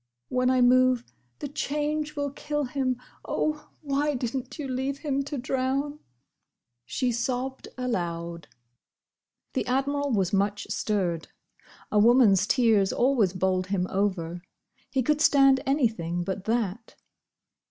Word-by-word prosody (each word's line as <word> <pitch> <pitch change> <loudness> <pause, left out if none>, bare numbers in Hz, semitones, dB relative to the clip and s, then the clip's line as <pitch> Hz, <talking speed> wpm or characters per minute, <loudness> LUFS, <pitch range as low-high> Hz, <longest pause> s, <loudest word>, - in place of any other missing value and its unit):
When 255 0 +2
I 255 -1 +3
move, 255 0 +4 0.3
the - - -5
change 300 +2 -2
will 285 -1 -2
kill 295 +1 -3
him. 255 -1 -1 0.2
Oh, 305 -1 -2
why 290 0 0
did 245 0 -3
n't 260 -1 -5
you 295 -3 -4
leave 265 +2 -2
him 280 -2 -1
to 285 0 -4
drown?" 270 +3 -1 0.9
she 250 - 0
sobbed 255 +2 -2
aloud. 170 -9 -3 1.1
The - - 0
Admiral 280 +2 0
was 195 -5 +1
much 200 +1 +1
stirred. 180 -6 -1 0.6
A 210 - +3
woman's 215 -4 +5
tears 220 -7 +3
always 240 -7 +2
bowled 185 0 0
him 190 -2 0
over. 180 -4 -1 0.5
He 265 -2 0
could 300 +4 +1
stand 275 -3 +5
anything 220 - 0
but 190 +1 -4
that. 225 -1 -2
250 Hz, 130 wpm, -27 LUFS, 200-275 Hz, 1.1 s, woman's